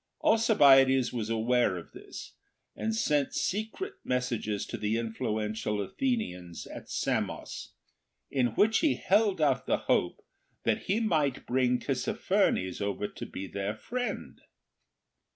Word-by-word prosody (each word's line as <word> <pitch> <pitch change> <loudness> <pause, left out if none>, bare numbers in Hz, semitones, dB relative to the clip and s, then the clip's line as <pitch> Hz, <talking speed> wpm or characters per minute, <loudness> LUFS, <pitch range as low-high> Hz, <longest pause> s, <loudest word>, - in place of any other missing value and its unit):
Alcibiades 135 - +5
was 115 -3 -3
aware 115 -3 +2
of 85 - -10
this, - - -10 0.4
and 225 0 -2
sent 150 - +1
secret 220 - -2
mes 125 0 0
sages 105 -3 -2
to - - -6
the 105 +1 -1
influential 110 -2 -2
Athenians 95 - -3
at - - -10
Samos, - - -3 0.6
in 130 -3 +2
which 220 +1 +4
he 310 -4 +2
held 200 -1 +2
out 140 -5 +2
the - - +2
hope - - +1 0.4
that - - 0
he 200 +4 +1
might 155 - 0
bring 125 0 +2
Tissaphernes 95 -5 0
over 100 0 -1
to - - -8
be 95 - -6
their 100 +2 -3
friend. 245 - -4
125 Hz, 130 wpm, -29 LUFS, -, 0.6 s, Alcibiades